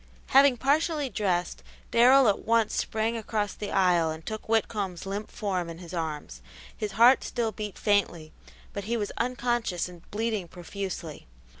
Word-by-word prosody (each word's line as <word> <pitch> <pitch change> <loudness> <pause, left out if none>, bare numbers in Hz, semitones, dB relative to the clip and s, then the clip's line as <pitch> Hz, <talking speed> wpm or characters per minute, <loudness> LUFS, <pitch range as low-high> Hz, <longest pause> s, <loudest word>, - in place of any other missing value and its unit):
Having 270 -1 +6
partially 295 +2 +1
dressed, 190 -5 -1 0.3
Darrell 255 +2 +6
at 205 - +2
once 230 -1 +1
sprang 220 +1 -1
across 215 -2 -2
the 205 - -6
aisle 180 -4 +3
and 160 0 -6
took 215 0 -6
Whitcomb's 205 -5 -1
limp 200 +2 -4
form 185 -5 -3
in 165 - -8
his 175 0 -11
arms. 150 - -4 0.3
His 210 -1 -4
heart 240 +4 +6
still 235 -3 -2
beat 210 -3 -6
faintly, 180 -7 0 0.4
but 200 -1 -5
he 235 +2 -1
was 205 -2 -3
unconscious 240 -7 -1
and 175 -2 -12
bleeding 215 -3 -2
profusely. 175 - -7
205 Hz, 155 wpm, -27 LUFS, 180-230 Hz, 0.4 s, Having